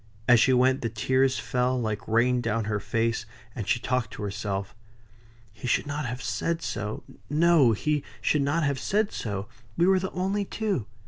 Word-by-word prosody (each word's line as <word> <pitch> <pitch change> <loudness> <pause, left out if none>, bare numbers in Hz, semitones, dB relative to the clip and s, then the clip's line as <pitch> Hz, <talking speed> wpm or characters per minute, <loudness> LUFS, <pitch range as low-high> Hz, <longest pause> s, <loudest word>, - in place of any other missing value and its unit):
As 120 -2 +7
she 130 - +4
went, 130 +1 +3
the 115 - -1
tears 130 +4 +1
fell 125 +1 0
like 110 -4 -3
rain 120 +2 +3
down 115 -1 0
her 105 0 -1
face, 115 +1 -1 0.3
and 110 -5 -5
she 120 - +2
talked 125 -2 -1
to 105 - -6
herself. 100 +1 -3 0.8
"He 110 +3 -7
should 120 - +2
not 145 -1 -3
have 125 +1 -5
said 165 0 -2
so. 105 +1 -4 0.3
No! 150 -5 +5
he 150 +7 0 0.2
should 150 - +1
not 145 +4 +1
have 140 -2 0
said 210 +1 0
so. 100 -2 -4 0.3
We 170 - +4
were 190 0 +4
the 190 +1 -3
only 195 +3 -1
two." 200 - -2
125 Hz, 185 wpm, -27 LUFS, 110-150 Hz, 0.8 s, As